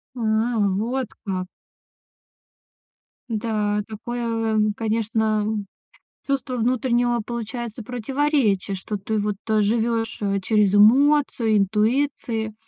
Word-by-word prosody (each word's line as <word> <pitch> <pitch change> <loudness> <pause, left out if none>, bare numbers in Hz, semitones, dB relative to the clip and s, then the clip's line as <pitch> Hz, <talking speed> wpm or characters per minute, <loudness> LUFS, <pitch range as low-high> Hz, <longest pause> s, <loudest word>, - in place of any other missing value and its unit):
А, - - -7 0.6
вот 245 +3 -1 0.2
как. 185 -2 -3 1.8
Да, 210 -2 -1
такое, 225 0 -2
а, - - +2 0.2
конечно, 220 -1 0 0.8
чувство 270 -2 -1
внутреннего, 240 0 +1
получается, 235 -1 -5
противоречия, 245 -5 0
что 210 +3 -5
ты 215 +2 -3
вот 205 -1 -1
то 215 -1 +1
живешь, 225 +1 0
э, 200 -1 0
через 205 0 +2
эмоцию, 245 0 +4
интуиции, 220 +2 0
225 Hz, 95 wpm, -23 LUFS, 210-240 Hz, 1.8 s, эмоцию